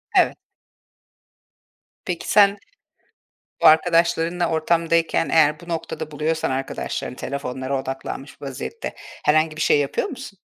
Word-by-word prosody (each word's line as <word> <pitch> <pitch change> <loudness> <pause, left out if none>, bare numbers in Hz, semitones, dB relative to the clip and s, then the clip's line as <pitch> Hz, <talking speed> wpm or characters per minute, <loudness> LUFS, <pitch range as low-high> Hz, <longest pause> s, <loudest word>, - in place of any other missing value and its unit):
Evet. - - +4 1.7
Peki, 175 -3 -3
sen 200 -1 +5 1.0
bu - - +1
arkadaşlarınla 170 +1 +3
ortamdayken, 165 -1 +1
eğer 150 -1 +4
bu 175 - -13
noktada 160 -2 -4
buluyorsan 155 +1 -1
arkadaşlarını 130 -1 -4
telefonlara 135 0 -3
odaklanmış 135 +1 -7
vaziyette, 140 - -6 0.3
herhangi 155 +1 +3
bir 155 - -5
şey 145 - +4
yapıyor 145 - -1
musun? 255 - -9
160 Hz, 110 wpm, -22 LUFS, 145-170 Hz, 1.7 s, sen